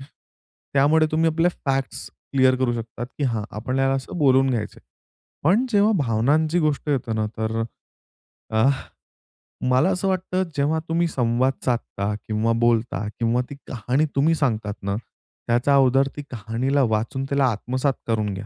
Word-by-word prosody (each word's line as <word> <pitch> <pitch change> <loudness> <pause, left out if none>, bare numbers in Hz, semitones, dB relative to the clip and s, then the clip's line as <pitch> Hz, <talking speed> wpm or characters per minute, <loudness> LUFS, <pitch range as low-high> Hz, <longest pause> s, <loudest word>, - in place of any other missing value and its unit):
त्यामुळे 145 +2 -1
तुम्ही 160 +1 +3
आपल्या 165 +2 +2 0.2
फॅक्ट्स 135 -1 -2 0.2
क्लिअर 130 -1 +4
करू 125 -2 +1
शकतात, 115 +1 -5
की 145 - 0
हां 115 -5 -1
आपण 130 +5 -2
ह्याला 135 0 +2
असं 135 +6 -4
बोलून 135 -2 +4
घ्यायचंय. 110 -4 -3 0.6
पण 200 +10 +4
जेव्हा 205 +2 +4
भावनांची 145 +6 +2
गोष्ट 150 -1 0
येते 125 -5 -1
ना, 110 -1 0
तर 110 +1 -1
अ, - - 0 0.9
आह, 135 +4 +3 0.9
मला 130 +8 +4
असं 195 +1 -1
वाटतं 185 0 0
जेव्हा 145 +3 +1
तुम्ही 170 +1 +2
संवाद 125 -1 +1
साधता 105 -4 -1
किंवा 110 +1 +1
बोलता 115 -4 +1
किंवा 115 +1 +2
ती 140 - -7
कहाणी 125 +6 0
तुम्ही 155 +4 +3
सांगतात 110 -8 -1
ना, 100 0 -1 0.5
त्याचा 120 +4 +3
अगोदर 135 0 +4
ती - - -3
कहाणीला 125 +5 0
वाचून 115 +5 -1
त्याला 140 -1 +2
आत्मसात 130 +5 -1
करून 105 -3 0
घ्या. 100 +2 -6
130 Hz, 155 wpm, -23 LUFS, 115-145 Hz, 0.9 s, क्लिअर